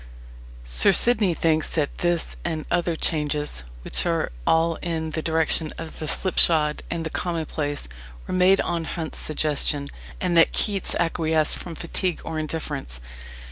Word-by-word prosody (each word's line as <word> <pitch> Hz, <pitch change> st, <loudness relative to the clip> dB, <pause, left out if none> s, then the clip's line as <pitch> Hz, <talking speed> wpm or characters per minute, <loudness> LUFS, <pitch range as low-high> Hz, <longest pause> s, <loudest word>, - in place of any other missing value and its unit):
Sir -, -, +4 dB
Sidney 215 Hz, -7 st, +4 dB
thinks 160 Hz, -1 st, +1 dB
that 150 Hz, -3 st, -1 dB
this 175 Hz, -1 st, 0 dB
and 160 Hz, -3 st, -3 dB
other 175 Hz, -1 st, +1 dB
changes, 150 Hz, -, -1 dB, 0.2 s
"which -, -, -1 dB
are 165 Hz, -2 st, 0 dB, 0.2 s
all 165 Hz, 0 st, +3 dB
in 160 Hz, -2 st, -3 dB
the 160 Hz, -, -2 dB
direction 160 Hz, -1 st, +1 dB
of 165 Hz, -1 st, -8 dB
the 155 Hz, -, -4 dB
slipshod 155 Hz, -4 st, +3 dB
and 165 Hz, -1 st, -3 dB
the 160 Hz, -, -4 dB
commonplace, 155 Hz, -, -2 dB, 0.4 s
were -, -, -5 dB
made 185 Hz, +1 st, +4 dB
on 170 Hz, -1 st, -2 dB
Hunt's 160 Hz, -2 st, -5 dB
suggestion, 145 Hz, -2 st, 0 dB, 0.3 s
and 180 Hz, -2 st, 0 dB
that 165 Hz, -, +6 dB
Keats 200 Hz, -3 st, +2 dB
acquiesced 160 Hz, -2 st, +1 dB
from 170 Hz, -2 st, -8 dB
fatigue 175 Hz, +2 st, -3 dB
or 160 Hz, -1 st, -3 dB
indifference." 150 Hz, -, -4 dB
160 Hz, 145 wpm, -24 LUFS, 155-170 Hz, 0.4 s, that